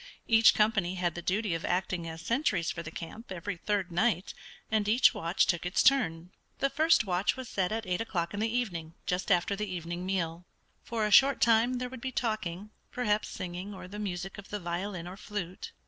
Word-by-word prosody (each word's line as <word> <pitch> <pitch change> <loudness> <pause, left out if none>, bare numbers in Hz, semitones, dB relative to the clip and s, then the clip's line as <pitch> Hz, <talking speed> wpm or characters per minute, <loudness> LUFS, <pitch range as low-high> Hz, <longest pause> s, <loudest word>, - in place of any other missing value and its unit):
Each 225 -1 +6
company 205 -4 +2
had 175 -2 0
the 175 - -6
duty 195 +2 0
of 165 - -3
acting 180 -2 -1
as 160 0 -8
sentries 205 - +1
for 170 - -5
the 155 - -7
camp 185 +7 -9
every 185 +2 -4
third 195 0 -1
night, 180 0 +1 0.4
and 215 -2 +1
each 230 +5 +5
watch 170 +3 +1
took 175 - 0
its 175 +1 +1
turn. 175 -10 +3 0.3
The 275 0 +1
first 315 -3 +4
watch 185 +5 +1
was 260 -1 -6
set 190 -3 -1
at 225 0 -2
eight 180 +1 -1
o'clock 175 -6 -2
in 205 - -3
the 220 +1 0
evening, 175 -10 -2
just 180 +3 -1
after 180 +2 +3
the 210 -1 -4
evening 175 0 -4
meal. 175 -2 -2 0.4
For 225 -2 -1
a 210 - -1
short 270 +5 +7
time 235 +2 +4
there 250 0 -2
would 255 -1 -9
be 260 - -3
talking, 215 -5 -2 0.2
perhaps 215 -4 0
singing, 185 +3 -6
or 185 - -9
the 205 +3 -8
music 190 -1 -4
of 200 - -11
the 210 - -3
violin 175 0 -4
or 185 +2 -8
flute. 200 -4 -6
195 Hz, 210 wpm, -30 LUFS, 175-220 Hz, 0.4 s, short